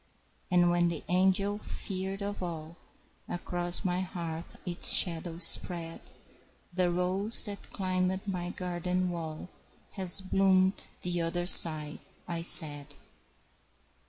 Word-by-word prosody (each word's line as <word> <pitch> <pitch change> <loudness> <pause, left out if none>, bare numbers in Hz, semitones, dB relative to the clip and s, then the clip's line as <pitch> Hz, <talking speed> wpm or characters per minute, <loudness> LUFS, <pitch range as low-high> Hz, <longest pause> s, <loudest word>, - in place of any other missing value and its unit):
"And 175 -1 0
when 175 0 -1
the 170 -2 -6
angel 190 +3 -2
feared 195 -1 -8
of 205 0 -8
all 165 -2 -9 0.5
Across 175 +1 -1
my 180 0 -3
hearth 170 -3 -9
its 175 -1 +3
shadow 165 -1 +1
spread, 170 -1 -1 0.7
The 180 0 -2
rose 185 +5 +2
that 205 -1 -10
climbed 185 0 -5
my 180 -2 -7
garden 180 0 -6
wall 165 0 -10 0.4
Has 190 -1 +2
bloomed 190 0 -2 0.2
the 175 -1 -4
other 175 +1 -5
side," 155 -4 +7 0.3
I 170 -1 -6
said. 150 -4 +6
180 Hz, 115 wpm, -26 LUFS, 170-185 Hz, 0.7 s, side